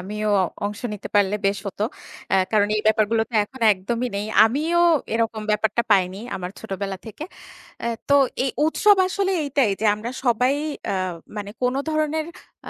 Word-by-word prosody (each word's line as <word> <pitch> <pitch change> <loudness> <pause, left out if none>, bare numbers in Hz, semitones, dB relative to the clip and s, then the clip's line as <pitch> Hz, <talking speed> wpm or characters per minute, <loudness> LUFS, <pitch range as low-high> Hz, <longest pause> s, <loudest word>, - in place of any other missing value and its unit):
আমিও 210 +3 -3 0.4
অংশ 205 +1 -4
নিতে 210 - -7
পারলে 205 0 +3
বেশ 200 0 +1
হত। 200 - -7 0.5
অ্যা - - +4 0.2
কারণ 205 -1 +3
এই - - +1
ব্যাপারগুলো 220 +1 +3
তো - - -11
এখন 260 +3 -15
একদমই 235 +6 -3
নেই। 205 +1 -2 0.2
আমিও 310 +9 +1 0.4
এরকম 225 -1 -1
ব্যাপারটা 215 +2 +1
পাইনি 190 -1 +3 0.2
আমার 180 -1 -5
ছোটবেলা 195 -2 -4
থেকে। 260 +8 -7 0.6
অ্যা 235 - -2 0.2
তো 280 - +3 0.3
এই 270 - 0 0.2
উৎসব 410 +6 +4
আসলে 385 +1 -1
এইটাই 275 -5 +1
যে - - +1
আমরা 220 +3 -6
সবাই 250 +3 +2 0.3
অ্যা - - -1 0.4
মানে 205 -1 -5
কোনো 250 +2 +1
ধরনের 310 0 0 0.4
আ - - -5
220 Hz, 165 wpm, -23 LUFS, 205-265 Hz, 0.6 s, অ্যা